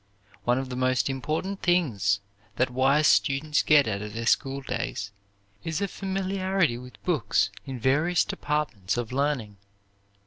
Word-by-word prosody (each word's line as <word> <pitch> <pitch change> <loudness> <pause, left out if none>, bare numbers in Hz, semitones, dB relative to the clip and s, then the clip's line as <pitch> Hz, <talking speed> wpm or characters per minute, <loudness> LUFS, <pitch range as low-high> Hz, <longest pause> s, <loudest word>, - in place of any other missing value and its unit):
One 120 +1 +3
of 130 0 -3
the 125 - -4
most 130 +1 +1
important 160 +9 -3
things 120 - +2 0.3
that 130 0 +1
wise 135 +4 +3
students 150 +2 +3
get 150 -4 +5
out 100 -2 -2
of 105 0 -6
their 115 0 -4
schooldays 130 -6 -1 0.5
is 160 -1 -2
a 200 - 0
familiarity 190 - -1
with 125 0 -13
books 130 - +1 0.2
in 130 -2 -5
various 150 +8 +2
departments 145 -11 -2
of 120 -1 -3
learning. 130 -7 -1
135 Hz, 140 wpm, -26 LUFS, 120-155 Hz, 0.5 s, get